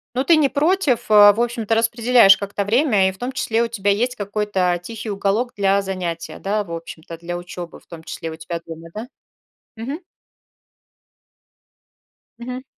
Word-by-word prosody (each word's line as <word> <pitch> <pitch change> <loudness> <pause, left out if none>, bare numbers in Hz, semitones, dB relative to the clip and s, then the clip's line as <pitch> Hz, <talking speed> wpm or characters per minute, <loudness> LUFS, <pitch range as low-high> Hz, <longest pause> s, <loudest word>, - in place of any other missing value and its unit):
Ну, 260 +2 0
ты 335 +1 +5
не 290 -3 +3
против, 285 - +1
а? 205 -1 +8
В 215 - -4
общем-то, 235 -2 0
распределяешь 230 -3 +5
как-то 200 0 -3
время 215 -3 +3
и, 190 - -2
в 190 - -18
том 250 +2 -4
числе, 230 -2 0
у 235 - -1
тебя 205 -3 -1
есть 245 +5 0
какой-то 200 -4 -1
тихий 220 +2 -7
уголок 205 +5 -1
для 200 0 +2
занятия, 180 -4 -5
да, 205 +1 -1
в 170 - -9
общем-то, 165 0 -8
для 175 +1 -5
учёбы, 175 -1 -8
в - - -29
том 165 -2 -11
числе, 165 0 -6
у 160 - -8
тебя 165 +1 -6
дома, 165 0 -9
да? 220 +4 -6 0.7
Мгм. 245 +7 -5 2.4
Мгм. 250 +2 -6
205 Hz, 170 wpm, -21 LUFS, 185-240 Hz, 2.4 s, а